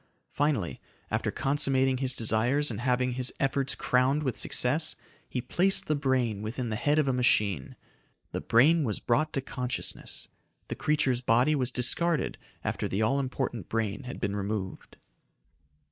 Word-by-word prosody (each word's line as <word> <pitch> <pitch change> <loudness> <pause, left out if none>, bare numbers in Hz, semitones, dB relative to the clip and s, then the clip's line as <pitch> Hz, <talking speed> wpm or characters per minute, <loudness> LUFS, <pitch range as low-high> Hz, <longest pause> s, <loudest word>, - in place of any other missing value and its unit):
Finally, 130 - -1 0.3
after - - -1
consummating 135 -2 +2
his 130 -1 0
desires 120 +6 +2
and 110 0 -5
having 125 0 +1
his 125 +1 -2
efforts 135 -1 0
crowned 130 +5 +1
with 130 -5 -1
success, 150 +6 +3 0.3
he 125 - -3
placed 180 +10 +2
the 155 - 0
brain 130 -7 0
within 115 +3 -4
the 110 - -2
head 145 +7 +1
of 150 -2 +2
a 135 - +1
machine. 105 - +1 0.6
The - - -4
brain 150 +8 +4
was 110 -6 -2
brought 155 +6 0
to 135 - -1
consciousness. 125 -1 -5 0.4
The - - -3
creature's 140 -5 +1
body 125 +5 +3
was 130 -4 0
discarded 150 +6 +1 0.2
after - - -2
the 100 +3 -1
all 135 +6 +1
important 130 - -3
brain 110 0 -2
had 125 - -7
been 100 0 -2
removed. 100 -1 -5
130 Hz, 155 wpm, -28 LUFS, 115-140 Hz, 0.6 s, brain